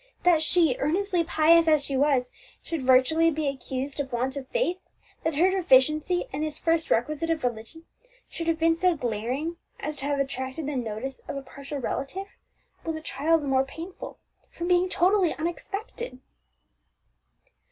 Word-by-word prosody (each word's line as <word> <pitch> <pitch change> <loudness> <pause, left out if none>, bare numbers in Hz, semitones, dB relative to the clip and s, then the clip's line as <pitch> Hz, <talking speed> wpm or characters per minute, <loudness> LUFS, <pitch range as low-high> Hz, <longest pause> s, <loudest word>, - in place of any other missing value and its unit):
That 345 -3 +5
she, 320 -5 +3
earnestly 355 +4 +1
pious 330 0 +4
as 305 -3 +4
she 275 - -3
was, 265 -2 +2 0.3
should 330 -4 -3
virtually 260 +6 +4
be 310 -1 -2
accused 270 0 -4
of 275 -2 -3
want 255 +3 -1
of 275 -2 -6
faith, - - 0 0.4
that 320 -2 0
her 360 +5 +4
deficiency 310 0 +3
in 280 - -3
this 310 -1 -2
first 330 0 0
requisite 305 +7 0
of 325 -3 0
religion 245 +7 -4 0.4
should 330 - -6
have 330 -1 +2
been 330 0 +3
so 355 +1 +2
glaring 250 +7 -3 0.2
as 300 +1 -4
to 270 - -3
have 285 -1 0
attracted 265 +2 -3
the 290 0 -3
notice 245 +2 -4
of - - -4
a 275 - -6
partial 275 +2 -8
relative, 275 +8 -3 0.6
was 325 -1 -3
a 315 - -6
trial 315 +2 +1
the 300 - -5
more 265 -1 +3
painful 330 +7 -9 0.3
from 345 - -5
being 360 0 +3
totally 365 0 +3
unexpected. 390 - -5
305 Hz, 165 wpm, -26 LUFS, 270-335 Hz, 0.6 s, That